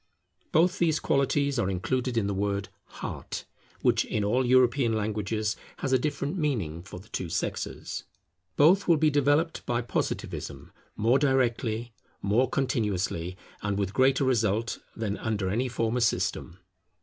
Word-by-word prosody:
Both 180 +5 +3
these 160 -3 +3
qualities 140 -1 +1
are 95 - +1
included 120 +6 -1
in 110 - +2
the 100 - -1
word 100 0 -1 0.2
Heart, - - -6 0.4
which - - +4
in 105 - -2
all 120 +6 +2
European 125 -1 +4
languages 110 0 -1 0.2
has 135 - -1
a 130 - +5
different 145 +3 -2
meaning 105 - -1
for 90 -1 -9
the 100 - -16
two 90 - -4
sexes. - - -3 0.5
Both 175 +7 +5
will 170 -2 +5
be 155 0 +3
developed 145 +3 +2
by 120 0 0
Positivism, 120 - -3 0.2
more 120 +5 +3
directly, 120 -4 +1 0.3
more 115 +6 +2
continuously, 95 -9 -1 0.2
and 100 -1 -1
with 100 -1 -1
greater 130 +3 +3
result, 115 -3 +1 0.2
than 105 -2 -3
under 105 -4 -1
any 120 +5 0
former 115 0 0
system. 90 -6 0
120 Hz, 145 wpm, -28 LUFS, 105-135 Hz, 0.5 s, a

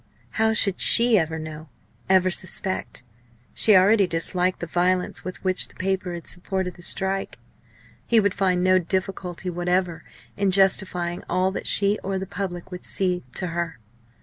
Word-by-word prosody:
How 220 0 +1
should 200 -3 +3
she 235 -2 +4
ever 160 -1 -2
know, 155 0 -8 0.4
ever 185 -1 +4
suspect! 185 -5 -2 0.5
She 215 - +5
already 195 +1 +5
disliked 180 +2 0
the - - -4
violence 180 +2 0
with 185 - -7
which 185 -1 +1
the - - -20
paper 185 -2 -2
had 170 - -9
supported 180 0 -3
the - - -16
strike. 195 +2 -1 0.7
He 230 - +4
would 200 -3 +1
find 185 -3 +1
no 185 0 +4
difficulty 185 0 -3
whatever 175 0 -1 0.3
in 200 -1 +1
justifying 185 -2 +2
all 185 +1 +1
that - - -4
she 200 +1 +3
or 195 0 -2
the 190 - -4
public 190 -2 -6
would 180 0 -8
see, 180 -3 0
to 185 - -2
her. 170 -4 -3
185 Hz, 160 wpm, -23 LUFS, 175-195 Hz, 0.7 s, She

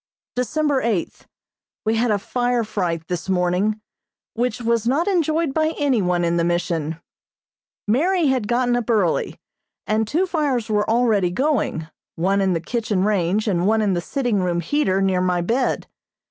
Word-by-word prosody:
December 275 +3 0
eighth: 215 -7 -2 0.6
We 220 - +2
had 230 +2 +1
a 210 - +2
fire 245 +3 -1
fright 170 -6 -2
this 180 +1 -4
morning, 185 +4 +1 0.5
which 245 +2 -1
was 230 -1 0
not 300 +9 +1
enjoyed 325 -5 +1
by 315 +1 0
any 275 -7 +2
one 180 -1 +1
in 170 0 +1
the 170 - +2
Mission. 165 -2 -1 0.9
Mary 335 - +2
had 260 -6 +1
gotten 245 +1 +1
up 245 -1 -2
early, 205 -8 +1 0.5
and 215 0 0
two 330 - +1
fires 285 - -1
were 210 0 +1
already 220 -5 +2
going, 230 - -1 0.3
one 195 +4 +1
in 190 -1 +2
the 165 - 0
kitchen 210 +1 -1
range 205 +1 +1
and 180 -2 +1
one 220 +1 +3
in 200 -2 +1
the 175 - -1
sitting 245 0 -1
room 175 -1 0
heater 195 - +1
near 185 -1 +1
my 180 -1 +1
bed. 235 +9 0
215 Hz, 165 wpm, -21 LUFS, 180-250 Hz, 0.9 s, one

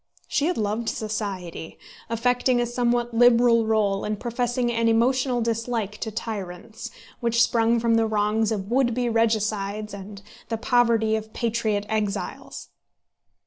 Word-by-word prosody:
She 290 - 0
had 355 - -1
loved 215 +2 -1
society, 200 -7 -5 0.3
affecting 245 +2 +1
a 240 - +1
somewhat 240 0 0
liberal 235 -1 +5
rôle, 210 -3 +1
and 210 -1 -3
professing 240 0 -1
an 230 0 +1
emotional 245 +2 +2
dislike 225 -2 -2
to 220 - -3
tyrants, 215 -1 -6 0.3
which 235 -1 0
sprung 235 0 +3
from 230 0 +2
the 225 0 +2
wrongs 215 +1 +1
of 200 -1 -3
would 245 -2 +2
be 245 -1 0
regicides 215 -2 0
and 200 0 -9 0.3
the 225 - -1
poverty 230 -2 +2
of 220 0 -5
patriot 220 -3 -1
exiles. 210 -2 -4
225 Hz, 140 wpm, -24 LUFS, 215-240 Hz, 0.3 s, liberal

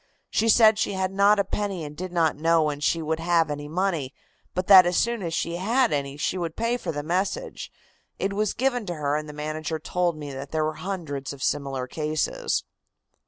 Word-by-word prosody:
She 225 +1 +2
said 220 -1 +6
she - - 0
had 190 -1 -1
not 200 +2 +4
a 200 - +3
penny 195 -3 -3
and 150 0 -7
did 185 +3 -6
not 165 -3 +2
know 165 +1 +3
when 150 -1 -1
she 160 +2 +1
would 160 +1 -1
have 165 -2 +2
any 145 0 -5
money, 165 -5 -1 0.4
but 185 +1 -1
that 185 -2 +9
as 175 - +1
soon 235 -1 +1
as 170 -3 -3
she 170 +1 -2
had 230 +5 +2
any 140 -1 -2
she 180 +5 -1
would 165 -2 -3
pay 230 +2 0
for 190 -9 -3
the 145 -1 -4
message. 190 - -2 0.5
It 195 +1 -1
was 210 +1 0
given 245 -4 0
to 175 - -3
her, 145 -1 -1
and 155 0 -3
the - - -7
manager 155 +1 -3
told 175 +1 -1
me 145 -2 -7
that 135 +1 -7
there 155 0 0
were 155 - -1
hundreds 155 -8 -4
of 135 - -8
similar 135 -3 -1
cases." 155 +3 -1
170 Hz, 215 wpm, -25 LUFS, 150-195 Hz, 0.5 s, that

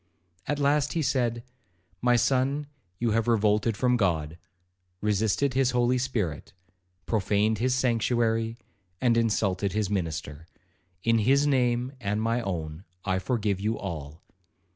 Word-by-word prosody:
At 145 - 0
last 145 0 +2
he 165 - 0
said, 120 -4 0 0.6
'My 125 0 +4
son, 130 +4 +1 0.3
you 115 +1 0
have 115 +1 +1
revolted 105 -1 +2
from 125 -1 +2
God, 85 -6 -1 0.6
resisted 105 +6 +1
his 130 -1 +2
Holy 120 +1 +2
Spirit, 105 - -3 0.5
profaned 105 0 +1
his 125 +2 +1
sanctuary, 115 -2 +1 0.4
and 120 -2 +3
insulted 100 -4 +1
his 105 -2 -1
minister,—in 90 +4 -3
his 135 +6 +3
name 125 -3 +1
and 105 0 -1
my 115 +2 0
own 80 -5 -4 0.2
I 95 -1 +1
forgive 100 -1 -1
you 110 +3 -1
all. 80 -4 -7
110 Hz, 125 wpm, -27 LUFS, 95-125 Hz, 0.6 s, My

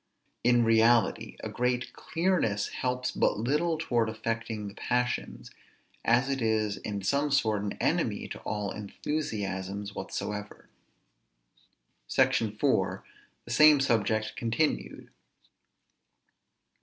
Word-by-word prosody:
In 120 0 +4
reality, 115 +1 +3
a - - -3
great 125 0 -1
clearness 165 - 0
helps 125 0 -2
but - - +1
little 150 +9 +1
towards 120 -8 0
affecting 110 -1 -3
the 100 - -8
passions, 125 +2 -2 0.5
as 120 +3 +3
it 135 -1 -1
is 110 -2 +1
in 100 -2 -5
some 140 +8 +1
sort 110 -7 +2
an 100 -1 -3
enemy - - 0
to - - -6
all 105 -2 -3
enthusiasms 100 -4 -4
whatsoever. 105 0 -5 1.4
SECTION - - +2
[IV]. - - +1 0.4
THE 120 - -8
SAME 150 +3 +7
SUBJECT 110 -4 +1
CONTINUED. 130 +5 -1
115 Hz, 105 wpm, -29 LUFS, 105-130 Hz, 1.4 s, SAME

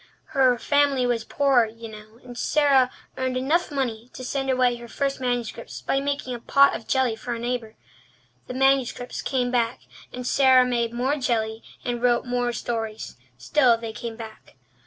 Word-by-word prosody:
Her 260 -2 +4
family 285 0 +2
was 240 -2 0
poor, 270 -1 +3
you 230 +1 -10
know, 215 +1 -13
and 245 -1 -10
Sara 270 -1 +3 0.3
earned 260 -1 -1
enough 300 +7 +1
money 250 -5 -3
to 255 - -8
send 270 +1 -2
away 250 -2 +2
her 235 0 -10
first 275 +2 -2
manuscripts 240 -2 -3
by 270 - +1
making 280 -2 -3
a 240 - -5
pot 280 +4 +4
of 220 - -8
jelly 260 -4 +1
for 240 +2 -5
a - - -6
neighbour. 235 -2 -3 0.7
The 250 - -6
manuscripts 265 -2 +1
came 250 -2 -1
back, 235 -1 0 0.3
and 250 0 -7
Sara 260 -1 +5
made 235 -2 0
more 255 +5 0
jelly 225 -4 -1 0.2
and 240 -2 -2
wrote 245 0 +2
more 245 -1 0
stories. 225 -2 -4 0.2
Still 245 - +3
they 225 -1 -6
came 230 0 -6
back. 220 -1 -11
245 Hz, 175 wpm, -24 LUFS, 230-265 Hz, 0.7 s, Sara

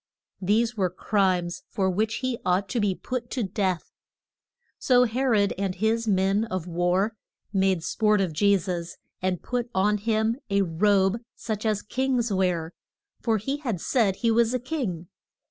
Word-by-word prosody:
These 225 +5 +2
were 190 -4 +1
crimes 180 -2 0
for 190 -2 0
which 215 +4 0
he 255 -2 -1
ought 185 +2 +1
to 240 - -1
be 205 -3 +1
put 245 +2 -4
to 250 - -2
death. 190 -4 -2 0.9
So 250 -1 +4
He 250 +2 -1
rod 215 -6 +3
and 195 -2 -1
his 225 +3 0
men 195 +2 +2
of 185 -6 -4
war 180 +4 +1 0.4
made 190 -3 +2
sport 215 +2 +2
of 185 -5 0
Je 200 +5 +4
sus, 175 -1 -4 0.2
and 185 -1 -1
put 245 -1 -2
on 205 +2 +2
him 220 +2 +1
a 200 0 +3
robe 195 +4 +2 0.2
such 220 -1 -3
as 210 -1 0
kings 250 -2 0
wear; 180 -3 0 0.5
for 225 -2 +2
he 270 +8 -2
had 240 - -3
said 210 -1 +1
he 230 +3 +1
was 235 +2 +3
a - - 0
king. 240 - -3
205 Hz, 165 wpm, -26 LUFS, 185-230 Hz, 0.9 s, So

